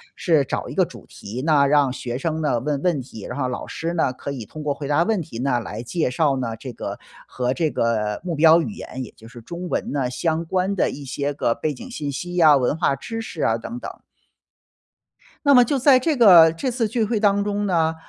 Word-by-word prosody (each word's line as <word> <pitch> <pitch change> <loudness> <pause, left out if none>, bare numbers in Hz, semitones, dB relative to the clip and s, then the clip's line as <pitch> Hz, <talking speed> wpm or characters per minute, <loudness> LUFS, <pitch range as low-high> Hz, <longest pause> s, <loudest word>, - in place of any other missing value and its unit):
是 160 -5 +2
找 - - -4
一 - - -7
个 - - +3
主 - - -13
题 120 +6 -8
呢， 145 -3 +4
让 140 -2 +3
学 120 -2 -4
生 160 +3 -2
呢 145 -6 +1
问 140 +2 -2
问 170 -4 +1
题， 120 -5 -9
然 125 - -5
后 130 -3 0
老 125 - -5
师 165 +1 -4
呢， 165 -6 +1
可 130 +2 -7
以 130 -5 -6
通 155 +9 -9
过 145 -1 0
回 140 0 -7
答 145 +3 +3
问 215 -1 0
题 115 -7 -9
呢 125 -1 0
来 115 0 -6
介 160 +3 -1
绍 140 +2 +1
呢， 115 -3 -3
这 125 +2 -8
个 - - -6 0.3
和 125 0 -2
这 160 +1 0
个 110 -4 -1
目 180 -2 -3
标 160 +2 +6
语 170 - -3
言， 130 -10 -7
也 120 - -11
就 110 - -15
是 120 +1 -12
中 175 +8 -7
文 - - -2
呢 135 -3 -1
相 160 +5 -1
关 185 +3 -1
的 185 - +1
一 145 - -8
些 140 +2 -2
个 135 -4 0
背 150 +3 -3
景 250 - -10
信 150 -11 -4
息 175 +6 -4
啊， 155 -4 +7
文 130 +2 0
化 160 -4 +1
知 225 - -6
识 180 -8 -5
啊 110 - +2
等 220 - -6
等。 - - -8 1.5
那 285 - +6
么 250 -2 +8
就 270 +3 0
在 260 0 +6
这 300 +2 0
个 175 -9 +8
这 165 +11 -3
次 235 -2 -1
聚 225 +2 0
会 220 0 -1
当 200 -1 +2
中 205 0 -2
呢， 165 -4 +1
150 Hz, 260 characters per minute, -22 LUFS, 130-180 Hz, 1.5 s, 么